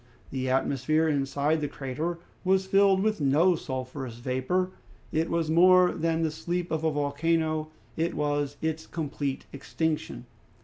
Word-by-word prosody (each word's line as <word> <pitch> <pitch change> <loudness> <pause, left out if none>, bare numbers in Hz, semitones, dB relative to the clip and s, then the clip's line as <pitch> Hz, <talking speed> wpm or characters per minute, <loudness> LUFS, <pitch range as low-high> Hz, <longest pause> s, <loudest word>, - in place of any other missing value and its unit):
The 130 -1 -2
atmosphere 140 +4 +1
inside 145 +1 +1
the 145 - 0
crater 150 +6 -4 0.3
was 190 0 +2
filled 195 0 +4
with 215 -6 0
no 155 +6 +4
sulphurous 130 -4 -5
vapor. 130 +10 -1 0.4
It 160 +1 0
was 165 -2 0
more 180 +2 +6
than 165 0 0
the 160 - 0
sleep 175 +3 -3
of 160 0 -1
a 160 - +3
volcano; 155 +2 0 0.3
it 165 +1 -1
was 145 -1 -1
its 160 0 -2
complete 145 -4 -3
extinction. 150 - -3
155 Hz, 140 wpm, -27 LUFS, 140-170 Hz, 0.4 s, more